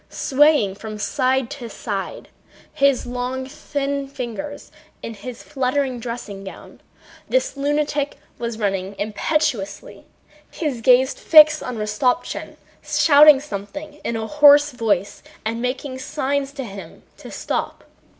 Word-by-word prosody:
Swaying 285 -7 +3
from 215 +2 -8
side 255 +4 0
to 255 -5 -7
side 200 -2 -5
on - - -28
his 275 -3 +2
long, 250 +1 -3
thin 280 -1 -4
legs 285 +4 -6 0.3
in 230 - -5
his 230 +4 -9
fluttering 265 -1 -1
dressing 230 -4 -6
gown, 190 - -11 0.5
this - - +1
lunatic 290 0 -1 0.2
was 235 -1 -4
running 195 -2 -2
impetuously, 215 0 -2 0.4
his 285 -8 -3
gaze 255 +3 +5
fixed 305 -1 +6
on 250 -2 -5
Rostopchín, 215 +7 -1 0.3
shouting 295 -2 +6
something 295 +4 -8
in 230 - -2
a 220 0 -3
hoarse 295 +2 +6
voice 205 -5 -1 0.2
and 230 +1 -2
making 260 +1 -3
signs 280 0 -2
to 275 -2 -5
him 195 -7 -10
to - - -11
stop. - - -4
260 Hz, 125 wpm, -21 LUFS, 220-290 Hz, 0.5 s, fixed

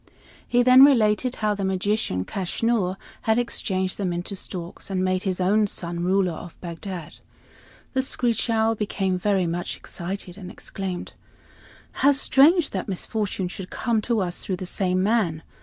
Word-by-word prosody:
He 245 0 +3
then 255 +1 +8
related 245 -2 +4
how 215 -1 0
the 200 -1 -4
magician, 190 - 0
Kaschnur, 195 0 -1 0.3
had 220 - +4
changed 185 0 -1
them 190 -3 0
into 175 +3 -4
storks 180 -1 -7
and 185 -1 0
made 185 0 +1
his 190 -2 -2
own 205 +3 +3
son 170 -2 -4
ruler 185 0 +2
of 170 +1 -10
Bagdad. 175 -1 -7 0.7
The 260 - +2
screech 245 -3 0
owl 225 0 +3
became 195 -3 -1
very 195 -1 +2
much 170 +1 -3
excited 180 +1 -6
and 185 -2 -8
exclaimed: 190 -1 -5 0.8
"How 285 +2 +4
strange 290 +4 +4
that 190 - -3
misfortune 200 0 -2
should 190 +1 -6
have - - -9
come 225 -2 +1
to 230 -3 +2
us 175 -2 -3
through 190 - -2
the 185 - -5
same 185 0 0
man. 190 -7 +1
195 Hz, 160 wpm, -24 LUFS, 180-220 Hz, 0.8 s, then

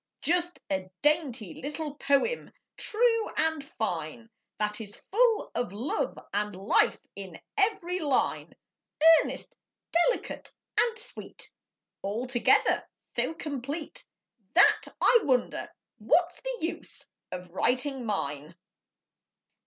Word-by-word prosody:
Just 350 +1 +3
a 190 -1 -1
dainty 275 - +2
little 295 +1 -4
poem, 285 - +1 0.2
true 455 0 +2
and 320 -2 +1
fine, 220 - -4 0.3
That 210 +1 -1
is 205 -2 -7 0.2
full 460 +1 +3
of 240 -5 -1
love 250 - -2 0.2
and 205 0 -1
life 195 +3 +3 0.2
in 190 -4 -8 0.2
every 390 -4 +1
line, 285 -6 0 0.7
Earnest, - - -6 0.4
delicate, 350 +9 0 0.2
and 465 -1 +2
sweet, 440 - -8 0.5
Altogether 240 +5 +2 0.3
so 325 - +1
complete 290 0 -5 0.5
That 365 - +6
I 475 - +6
wonder 255 -7 0 0.3
what's 325 +11 +2
the - - -3
use 330 +2 -4 0.3
of 180 -1 -7
writing 255 - 0
mine. 155 -7 -3
275 Hz, 105 wpm, -29 LUFS, 210-350 Hz, 0.7 s, That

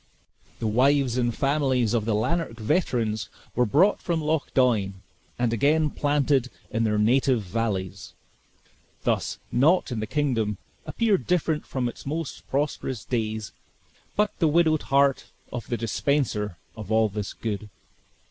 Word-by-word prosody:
The - - -4
wives 130 +3 +3
and 120 -1 +1
families 135 -3 +1
of 115 -3 +1
the 110 -2 +1
Lanark 165 +7 0
veterans 110 - 0 0.2
were 125 0 +2
brought 175 - +3
from 170 -2 -1
Loch 155 -1 -1
Doine, 110 -7 +2 0.4
and 120 -1 +1
again 150 +6 +2
planted 145 -3 +1 0.2
in 115 +1 +1
their 105 -1 +1
native 120 +2 +3
valleys; 100 -2 -3 0.9
thus, - - 0
naught 150 +6 +3
in 120 - -2
the 110 - -3
kingdom 115 -7 0 0.3
appeared 220 -5 +1
different 165 -3 0
from 130 -2 -1
its 120 - -7
most 160 +1 -4
prosperous 135 -4 -2
days, 110 -3 -2 0.6
but 210 0 +2
the 165 - +4
widowed 155 0 +3
heart 140 0 +3 0.3
of 120 -3 -5
the 120 - -1
dispenser 105 - -1 0.2
of 110 -1 -8
all 110 0 +4
this 105 -1 -5
good. 105 -1 -4
125 Hz, 140 wpm, -25 LUFS, 110-145 Hz, 0.9 s, the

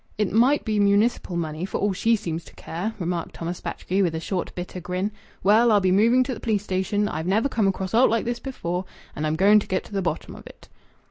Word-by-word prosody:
"It 210 -3 0
might 255 +7 +3
be 215 -2 0
municipal 200 -1 +2
money, 160 -1 -3
for 190 - -2
all 205 -1 0
she 225 +5 +2
seems 170 -6 -4
to - - -16
care!" 195 +7 -5
remarked 175 -2 -3
Thomas 170 +1 -5
Batchgrew, 190 +2 -2
with 170 -4 +1
a - - -2
short, 180 +2 -3
bitter 180 +1 -6
grin. 180 +4 -2 0.3
"Well, 225 +4 +5
I'll 210 - +5
be 185 -1 +2
moving 230 +6 +4
to 255 0 -3
th' - - -8
police 210 -3 0
station. 205 +2 0
I've 160 -1 -4
never 215 +7 +2
come 220 -7 +1
across 190 0 -2
aught 240 +3 +5
like 230 0 0
this 240 0 -2
before, 180 -9 -4 0.3
and 155 +1 -2
I'm 155 - 0
going 200 +5 +6
to - - -7
get 185 -1 -1
to - - -14
the 195 - 0
bottom 175 - -3
of - - -12
it." - - -15
195 Hz, 245 wpm, -24 LUFS, 180-220 Hz, 0.3 s, going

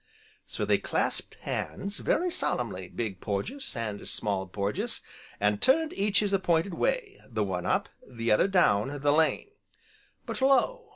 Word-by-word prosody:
So - - -3
they - - +3
clasped - - -1
hands, 200 +1 -4
very 360 +1 +1
solemnly, 100 - -1
Big 100 -1 -4
Porges, 210 - -3
and 105 -3 -4
Small 95 -2 -1
Porges, 100 +2 -2 0.4
and 105 0 +1
turned 315 +4 +3
each 200 +1 +2
his 205 -1 0
appointed 175 -1 +2
way, - - -1
the 110 -3 0
one 90 -3 -2
up, - - +1 0.2
the 115 -2 -2
other 105 - +5
down, 145 - +2
the 145 0 +4
lane. 160 - +2 0.7
But - - -5
lo! 275 - +3
145 Hz, 150 wpm, -28 LUFS, -, 0.7 s, other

